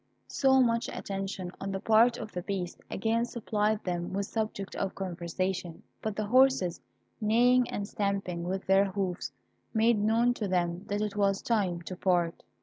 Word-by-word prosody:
So 265 -1 +3
much 235 -2 +2
attention 195 -2 -4
on 195 - -3
the 195 - -2
part 230 +4 +4
of 215 -2 -7
the 180 - -4
Beast 180 -2 -4
again 225 +3 0
supplied 215 -2 -1
them 175 0 -3
with 200 +1 -1
subject 215 -2 -3
of 195 - -2
conversation; 180 -1 -3 0.2
but 215 -2 -3
the 215 - -2
horses, 255 -6 +3 0.4
neighing 245 +3 +4
and 200 0 -3
stamping 195 -5 -2
with 190 +2 -3
their 195 +1 +5
hoofs, 190 -2 -3 0.4
made 225 0 +4
known 225 +3 +3
to 215 -4 -3
them 175 -1 -1
that 205 +1 -1
it 210 -1 -2
was 200 -1 +1
time 190 -7 0
to 185 - -6
part. 175 -2 +1
200 Hz, 165 wpm, -29 LUFS, 185-220 Hz, 0.4 s, their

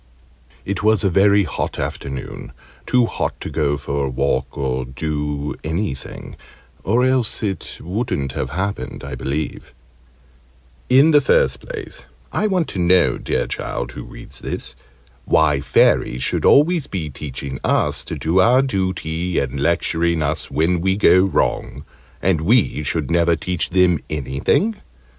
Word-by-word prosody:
It 100 0 -2
was 110 -2 +3
a 100 - +2
very 100 +2 +4
hot 80 - -3
afternoon 70 -2 -5 0.3
too 125 -1 +4
hot - - -3
to - - -5
go 75 -2 0
for 70 0 -2
a - - -2
walk 65 0 -1
or 65 -2 -1
do 75 +2 -3
anything 80 -4 -4 0.5
or 120 +5 +2
else 130 -4 0
it 100 -3 -3
wouldn't 90 - -2
have 65 - -3
happened, 95 +7 -4
I - - -6
believe. 70 0 -4 1.1
In 135 +5 +6
the 145 -1 +6
first - - +2
place, - - -8 0.3
I 215 - 0
want 185 -5 +1
to 95 - -5
know 90 0 +3
dear - - -1
Child - - -4
who - - -8
reads - - -10
this! - - -5 0.5
why 75 -3 +3
Fairies 65 -2 +2
should - - 0
always 155 +1 +4
be 80 -6 -4
teaching 70 -1 -6
us - - +1
to - - -5
do 85 +4 +1
our 125 +7 +5
duty, 90 -6 -2
and 70 0 -1
lecturing 85 +1 +1
us 70 - -2
when 85 +3 +1
we 95 +1 +1
go 95 - +6
wrong, 60 -10 -1 0.4
and 90 -4 +2
we 110 -2 +2
should 75 -1 -2
never 85 0 +3
teach 90 +1 -2
them 90 -3 +3
anything? 75 - 0
85 Hz, 150 wpm, -20 LUFS, 70-100 Hz, 1.1 s, In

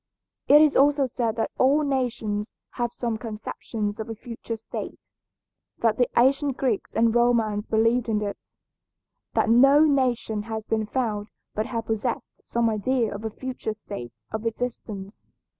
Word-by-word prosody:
It 295 +2 +8
is 300 - +3
also 285 0 +4
said 235 -3 -1
that 225 - -1
all 280 +4 +4
nations 240 -6 -1 0.2
have 240 -1 -2
some 235 -3 -3
conceptions 215 -1 -4
of 220 - -5
a 225 - -4
future 230 0 -6
state, 225 - -8 0.7
that 225 -2 +2
the 245 - +3
ancient 275 +2 +3
Greeks 245 -7 -1
and 230 0 +3
Romans 230 -3 +2
believed 230 +2 +2
in 215 -1 +2
it, 200 -1 -4 1.0
that - - +3
no 275 +5 +7
nation 255 -7 +2
has 220 0 -5
been 220 -1 -1
found 215 -4 -1 0.3
but 215 +1 -1
have 230 -2 -3
possessed 225 +2 -3
some 235 0 0
idea 225 +1 0
of 205 +2 -7
a - - 0
future 250 -1 -5
state 120 - -9
of 220 +1 -2
existence. 220 -4 -5
230 Hz, 155 wpm, -25 LUFS, 215-250 Hz, 1.0 s, It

